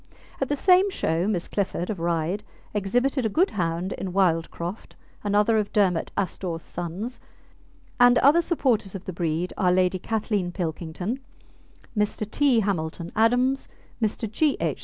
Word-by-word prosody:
At 270 - 0
the 290 - +1
same 370 +6 +5
show 170 - 0
Miss 185 -5 -1
Clifford, 195 -2 -2
of 195 - -5
Ryde, 170 +4 -1 0.3
exhibited 245 +7 +1
a 220 - +1
good 350 - +2
hound 175 0 -1
in 185 -2 -5
Wildcroft, 175 +1 -1 0.3
another 210 +2 +3
of 210 - -2
Dermot 185 -5 +2
Astore's 175 -3 -2
sons, 180 +8 -5 0.8
and 245 0 +7
other 290 +7 +6
supporters 250 - 0
of 195 - -7
the 185 - -5
breed 170 +1 -1
are 180 -2 +3
Lady 185 0 +2
Kathleen 210 -3 -1
Pilkington, 175 - -3 0.8
Mr. 210 0 0
T. 255 0 +3
Hamilton 170 -4 -2
Adams, 245 +4 +2 0.3
Mr. 220 +1 0
G. 280 +8 +1
H. - - -1
200 Hz, 145 wpm, -25 LUFS, 175-235 Hz, 0.8 s, and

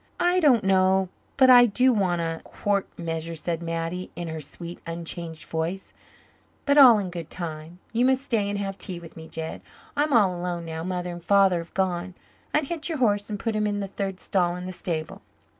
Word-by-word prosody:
"I 355 +1 +3
don't 270 - +4
know 190 0 +3 0.3
but 260 -1 +7
I 245 -1 +9
do 250 +4 +3
want 185 -5 +1
a 165 -1 -3
quart 200 -1 -1
measure," 165 -1 -4
said 165 +1 -3
Mattie, 165 +2 -3
in 175 -1 -5
her 160 -1 -5
sweet, 170 +4 -8
unchanged 165 -1 -6
voice, 165 +4 -3 0.7
"but 285 - +3
all 250 -5 +9
in 190 -3 -3
good 170 -3 -6
time. 165 -1 -6 0.2
You 240 +2 +3
must 265 +1 +2
stay 215 -7 0
and 205 - -2
have 195 -1 -4
tea 180 -3 -4
with 165 -1 -13
me, 160 0 -10
Jed. 160 0 -6 0.3
I'm 295 +1 +1
all 205 -8 +4
alone 175 -1 -3
now 160 0 -5
Mother 180 0 -3
and 175 -1 -8
Father 195 -2 +4
have 170 0 -10
gone. 185 -1 -1 0.4
Unhitch 305 +2 -1
your 320 - -2
horse 205 -5 +1
and 205 -1 -4
put 225 0 -2
him 210 0 +1
in 205 0 -1
the 200 - -2
third 195 -1 -4
stall 175 -2 0
in 180 0 -6
the 185 - -4
stable." 165 -3 -4
185 Hz, 205 wpm, -25 LUFS, 170-210 Hz, 0.7 s, I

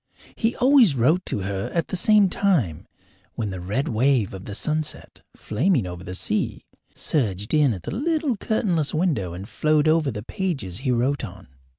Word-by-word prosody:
He 225 +1 0
always 250 - +5
wrote 155 +10 +2
to 105 - -2
her 95 0 -3
at 170 - 0
the - - -2
same 210 +2 +5
time 165 - 0 0.5
when 105 -3 -3
the 95 - -5
red 105 - -2
wave 120 -3 +1
of 95 -1 -8
the 100 - -6
sunset, 155 +4 -3
flaming 135 - 0
over 90 0 -7
the 90 0 -6
sea, - - -1 0.3
surged 105 - -1
in 150 -4 +4
at 95 -6 -5
the - - -5
little 300 +1 0
curtainless 180 -9 0
window 145 - 0
and 95 +3 -7
flowed 155 +3 +1
over 155 -2 +3
the 105 -4 -5
pages 130 - -3
he 130 0 -2
wrote 125 +4 +1
on. - - -9
140 Hz, 180 wpm, -23 LUFS, -, 0.5 s, always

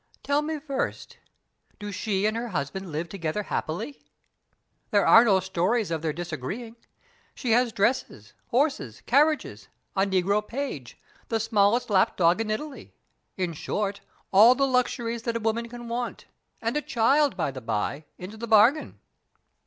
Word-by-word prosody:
"Tell 285 +1 +1
me 310 +1 -3
first, 280 -2 -4 0.6
do 205 -1 -6
she 200 0 -1
and 215 +1 +1
her 235 +1 -3
husband 180 0 -4
live 160 +3 -3
together 170 +2 -3
happily?" 175 - -4 0.9
"There 205 -2 +3
are 230 - +8
no 200 -5 +4
stories 190 +3 0
of 160 -2 -1
their 160 -1 -1
disagreeing. 175 - -5 0.6
She 245 - -2
has 240 +1 +3
dresses, 205 - -1
horses, 245 - 0
carriages; 270 - +2 0.3
a 195 +1 +2
negro 195 +2 +2
page, 240 - -5 0.3
the 225 - 0
smallest 220 +1 +2
lap 190 -2 +3
dog 175 +4 +3
in 220 - -3
Italy 275 +7 -5 0.4
in 180 -3 -1
short, 200 +5 -3 0.3
all 220 +6 +8
the 275 +1 +2
luxuries 240 -3 0
that 230 0 -2
a - - -4
woman 230 +1 -1
can 240 0 -9
want; 240 +1 -4 0.4
and 230 +3 -1
a 300 - +1
child, 275 +1 +2
by 160 - -1
the 130 -1 -8
by, 115 +7 -2
into 190 +5 -9
the 235 +1 -6
bargain." 225 +8 +4
215 Hz, 155 wpm, -26 LUFS, 180-240 Hz, 0.9 s, are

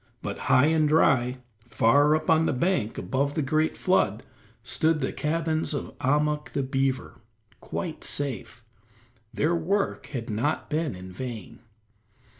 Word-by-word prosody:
But - - -4
high 130 - +6
and 155 -1 +3
dry, 130 -5 +3 0.3
far 145 +7 +4
up 155 - -3
on 160 0 +4
the - - +1
bank 130 - 0
above 140 +2 -1
the 155 - 0
great 155 +3 0
flood, 115 - +1 0.4
stood 155 +7 +1
the 135 - -2
cabins 160 0 -1
of 140 - -5
Ahmuk 150 +2 0
the 140 - 0
beaver, 135 0 -2 0.4
quite 165 -5 -5
safe; 130 -4 -3 0.7
their 150 +8 +1
work 195 +5 -1
had 120 -5 -5
not 120 +11 -2
been 155 - -1
in 90 0 -9
vain. 115 +1 -7
145 Hz, 140 wpm, -26 LUFS, 125-155 Hz, 0.7 s, high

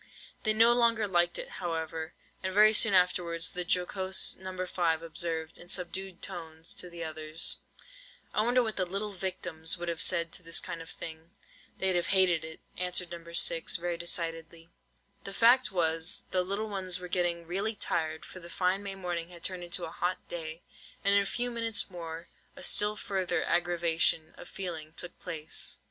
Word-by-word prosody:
They 215 - +2
no 230 +2 +6
longer 230 -3 +3
liked 175 -2 +2
it, - - -5
however; 160 -2 -3 0.3
and 190 - -2
very 215 +2 +7
soon 210 -2 +5
afterwards 175 -2 +2
the 180 - -3
jocose 185 +2 +3
No. 185 -1 -5
5 165 -3 0
observed, 160 -1 -2
in 175 - -11
subdued 185 0 -2
tones 165 -3 -4
to 180 - -3
the 170 -1 -6
others:— 155 0 +1 0.8
"I - - +3
wonder 245 +3 +4
what 220 -2 -3
the 185 - +1
little 200 +3 -3
victims 180 -4 -3
would 175 0 -3
have 165 0 -1
said 170 -2 +3
to - - -2
this 165 -1 +2
kind 165 - -5
of 165 - -10
thing?" 160 0 -9 0.5
"They'd 190 -1 +1
have 175 - +1
hated 180 -4 +4
it," 160 0 -9 0.2
answered 180 -1 0
No. 170 -1 -7
6, 170 0 +1
very 175 0 -1
decidedly. 165 -1 -3 0.5
The 195 - -7
fact 245 +1 +5
was, 165 -2 +1
the 185 - +2
little 200 +4 -2
ones 185 -3 0
were 180 - -6
getting 175 -1 0
really 200 +6 -2
tired, 160 -5 -1
for 185 - -10
the 170 -1 -11
fine 185 +2 +1
May 200 -1 -5
morning 175 -3 -3
had 170 -2 -12
turned 185 -2 0
into 175 0 +2
a 160 - -7
hot 180 +2 -1
day; 160 -1 -5 0.4
and 200 - +5
in 200 - +6
a 200 - -2
few 245 +3 -1
minutes 230 -4 0
more, 165 -1 -7 0.3
a - - -10
still 210 0 +4
further 190 -3 -1
aggravation 170 -2 +2
of - - -11
feeling 160 -5 -6
took 175 +1 -4
place. 155 -1 -3
175 Hz, 185 wpm, -30 LUFS, 165-190 Hz, 0.8 s, very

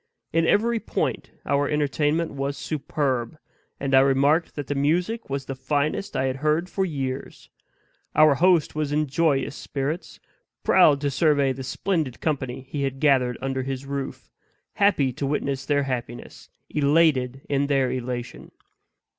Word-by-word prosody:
In 165 0 +2
every 230 +2 +2
point - - -2 0.2
our 140 +1 +1
entertainment 150 +2 0
was 140 0 -3
superb; 140 -3 -2 0.4
and 135 -1 -2
I 130 - +8
remarked 140 +5 +3
that 145 - -4
the 145 - -2
music 175 +11 0
was 135 0 -3
the 135 - -4
finest 145 +7 -1
I 130 - +1
had 130 0 -1
heard 155 +5 0
for 195 - 0
years. 135 -6 -5 0.6
Our 155 -1 +6
host 170 +2 +3
was 150 -1 -2
in 150 +1 +1
joyous 145 -1 0
spirits; 145 +5 -4 0.4
proud 150 -7 +5
to 145 -1 0
survey 145 -2 +2
the 135 - -8
splendid 145 +1 -2
company 135 -5 -2
he 135 +2 -5
had 135 -1 -2
gathered 130 -5 +3
under 135 0 -2
his 135 +1 -4
roof; 140 -1 -5 0.4
happy 145 -11 +2
to 140 +3 -3
witness 140 -1 -2
their 145 -1 +2
happiness; 120 -3 -6 0.2
elated 140 -3 +2
in 140 0 +1
their 135 -3 +2
elation. 125 -1 -5
140 Hz, 150 wpm, -24 LUFS, 135-155 Hz, 0.6 s, I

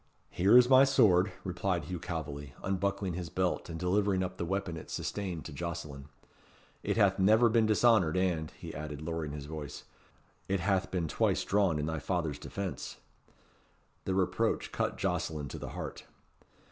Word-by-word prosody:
"Here 100 +7 +5
is 125 -1 +7
my 130 +1 +8
sword," 105 -9 +4
replied 90 -1 -1
Hugh 90 -1 -5
Calveley, 75 -5 -5
unbuckling 95 0 -1
his 85 -1 -5
belt 90 +1 -1
and 80 -1 -5
delivering 95 +1 +1
up 90 0 -5
the 85 - -2
weapon 95 -1 -2
it 80 - -9
sustained 95 -6 -4
to - - -7
Jocelyn; 75 -3 -6 0.7
"it - - -1
hath 100 -3 +4
never 110 +5 +5
been 110 -1 +3
dishonoured, 110 -6 +4
and," 85 -4 0
he - - -8
added, 75 -2 -6
lowering 80 -2 -3
his 70 -1 -6
voice, 75 -1 -7 0.6
"it 95 0 0
hath 95 +1 +1
been 90 -3 -1
twice - - +1
drawn 95 -5 +2
in 75 - -1
thy 80 0 -2
father's 80 -1 -2
defence." 100 -2 -5 1.1
The 95 - 0
reproach 95 +4 0
cut - - -1
Jocelyn 75 -3 -2
to - - -7
the - - -6
heart. - - -6
90 Hz, 165 wpm, -31 LUFS, 80-100 Hz, 1.1 s, my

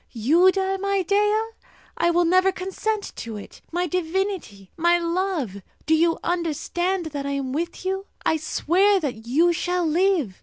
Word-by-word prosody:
You 315 +11 +4
die, 385 0 -1
my 395 0 0
Dea? 415 +3 +2 0.6
I 340 - +2
will 345 0 +3
never 370 +3 +4
consent 395 +3 -3
to 225 -2 -6
it! 205 - -11
My 350 +2 0
divinity, 355 - -3
my 345 +1 +3
love! 340 - -2 0.2
Do 315 - +2
you 330 +1 +3
understand 350 +2 -1
that 280 -1 -3
I 280 - -2
am 270 -2 -3
with 340 +4 -4
you? 385 +1 -2 0.2
I 320 - +3
swear 380 +6 +2
that 245 -8 -5
you 330 +8 +3
shall 355 +1 -1
live! 325 - +1
345 Hz, 160 wpm, -23 LUFS, 305-380 Hz, 0.6 s, You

